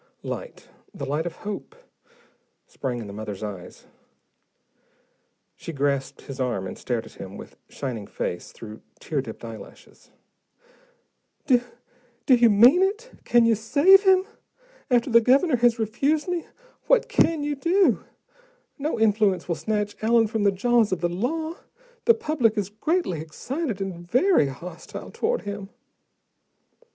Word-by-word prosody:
Light, - - -7 0.3
the - - -5
light 150 +4 -1
of 175 - -6
hope, 210 - -6 0.9
sprang 130 -3 -4
in - - -7
the 100 - -8
mother's 105 -1 -6
eyes. 100 -4 -8 1.7
She - - -7
grasped 140 -2 -1
his 135 -2 -9
arm 120 -7 -1
and 95 - -6
stared - - -3
at - - -14
him - - -8
with - - -11
shining 120 -7 -5
face, 90 - -4
through 110 -1 -11 0.2
tear 150 -4 -2
dipped 115 -2 -9
eyelashes. 115 -1 -12 1.4
"Do 255 -4 +4 0.6
do 265 - +5
you 240 -1 +6
mean 240 - +6
it? 425 +6 -1
Can 240 -1 +4
you 230 - +4
save 290 - +5
him? 380 -1 +4 0.6
After 245 0 +2
the 235 0 +7
Governor 265 +4 +3
has 240 0 +3
refused 275 - 0
me? 355 -2 -2 0.4
What - - +4
can 325 -3 +2
you 295 0 -1
do? 355 +7 +2 0.8
No 295 -3 -2
influence 210 -3 +2
will 175 - 0
snatch 210 +6 -2
Allen 225 +1 +4
from 220 0 -2
the 200 - +5
jaws 230 +2 +2
of 185 - -1
the 175 - +1
law: 315 - -3 0.5
the 465 - +6
public 295 - 0
is 200 -2 -1
greatly 215 - -1
excited 235 - -4
and 195 -1 -3 0.2
very 260 - +4
hostile 165 +6 -9
toward 460 +1 -1
him." 205 -1 -6
220 Hz, 145 wpm, -24 LUFS, -, 1.7 s, the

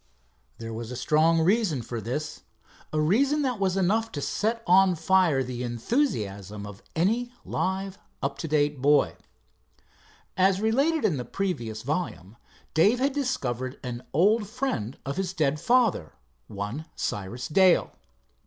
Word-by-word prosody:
There 115 0 -6
was 115 0 -6
a 125 - -5
strong 155 +6 +3
reason 180 - +2
for 115 0 -5
this—a 150 +4 -6
reason 270 - +2
that 250 -5 -1
was 195 -1 +1
enough 220 +5 +1
to 145 - -3
set 230 +2 -1
on 185 0 +5
fire 165 -4 +3
the 125 -1 -5
enthusiasm 110 - -2
of 105 +1 -10
any 225 +9 +1
live, 190 +1 -2 0.2
up 140 0 -3
to 165 - -3
date 145 -2 +1
boy. 145 +2 +3 1.2
As 190 +1 +3
related 275 +9 +2
in 155 - +2
the 125 - -3
preceding 120 - -3
volume, 120 - -4 0.4
Dave 200 +10 +4
had 270 +2 +1
discovered 130 - -2
an 125 -1 -5
old 205 +7 +3
friend 215 - -3
of 140 +5 -4
his 190 -1 -2
dead 150 -4 0
father, 225 - +2 0.3
one 105 +10 -5
Cyrus 105 +5 -4
Dale. 185 +2 +4
160 Hz, 140 wpm, -26 LUFS, 125-205 Hz, 1.2 s, on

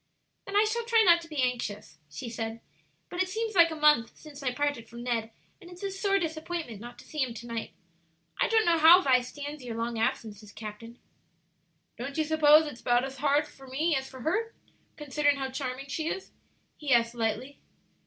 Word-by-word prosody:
"Then 395 - -5
I 415 - +6
shall 465 +2 -1
try 455 -1 +4
not 340 -1 +6
to 330 - -11
be 300 -5 -1
anxious," 210 -10 -3
she 150 +10 -7
said; 225 0 -4 0.5
"but 360 - -1
it 375 - 0
seems 445 +2 -2
like 340 -3 +6
a 320 - -5
month 300 -6 +3
since 295 -2 -12
I 260 -2 0
parted 285 -4 -2
from 235 +1 -9
Ned, 230 -2 -1 0.3
and 350 - -13
it's 360 +2 -12
a 395 - -2
sore 395 +1 +1
disappointment 320 - -4
not 240 +1 -10
to - - -14
see 305 - -7
him 255 -4 0
to 235 - -8
night. 230 -1 -5 0.7
I - - +4
don't 445 -1 +3
know 335 -1 +3
how 335 +4 +9
Vi 255 -2 +4
stands 290 +3 -7
your 235 -2 -5
long 230 0 -2
absences, 210 -2 -2
captain." 225 +2 -9 1.0
"Don't 275 +4 -5
you 315 - +2
suppose 310 0 +5
it's 285 -6 -8
about 245 0 +2
as 270 0 -8
hard 290 +2 +2
for 270 0 -15
me 305 +5 0
as 265 0 -3
for 260 -1 -11
her, 430 - -1 0.4
considering 290 -1 +1
how 265 -1 -3
charming 260 0 -4
she 315 +3 -3
is?" 380 - -4 0.5
he 295 -2 -4
asked, 235 -1 +4
lightly. 235 +4 -3
280 Hz, 205 wpm, -28 LUFS, 235-325 Hz, 1.0 s, how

